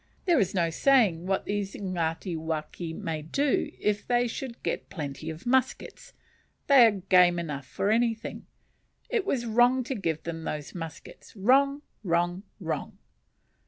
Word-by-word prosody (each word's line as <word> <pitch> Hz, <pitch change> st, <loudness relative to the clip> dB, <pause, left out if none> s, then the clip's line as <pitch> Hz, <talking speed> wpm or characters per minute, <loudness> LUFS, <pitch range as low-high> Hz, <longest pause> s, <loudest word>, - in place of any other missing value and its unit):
There 345 Hz, -6 st, +4 dB
is 195 Hz, -2 st, 0 dB
no 170 Hz, -2 st, +1 dB
saying 195 Hz, -6 st, +3 dB
what 195 Hz, 0 st, 0 dB
these 205 Hz, -1 st, -3 dB
Ngatiwaki 165 Hz, -3 st, -3 dB
may 160 Hz, -1 st, -4 dB
do 275 Hz, -, 0 dB
if 210 Hz, 0 st, -1 dB
they 245 Hz, 0 st, +2 dB
should 235 Hz, +1 st, -6 dB
get -, -, -3 dB
plenty 150 Hz, -1 st, -5 dB
of 160 Hz, +1 st, -8 dB
muskets; 260 Hz, +1 st, -1 dB, 0.5 s
they 265 Hz, -5 st, +8 dB
are 205 Hz, -3 st, -1 dB
game 180 Hz, -2 st, +5 dB
enough 150 Hz, -5 st, -4 dB
for 200 Hz, -, -1 dB
anything. 230 Hz, 0 st, -1 dB, 0.6 s
It 445 Hz, -5 st, 0 dB
was 245 Hz, -9 st, 0 dB
wrong 245 Hz, +3 st, +3 dB
to 265 Hz, -, -3 dB
give 165 Hz, -, -2 dB
them 165 Hz, -1 st, -5 dB
those 150 Hz, -2 st, -5 dB
muskets; 165 Hz, +3 st, -9 dB
wrong, 275 Hz, +7 st, +3 dB, 0.2 s
wrong, 175 Hz, 0 st, 0 dB, 0.2 s
wrong!" -, -, -4 dB
195 Hz, 145 wpm, -27 LUFS, 165-240 Hz, 0.6 s, they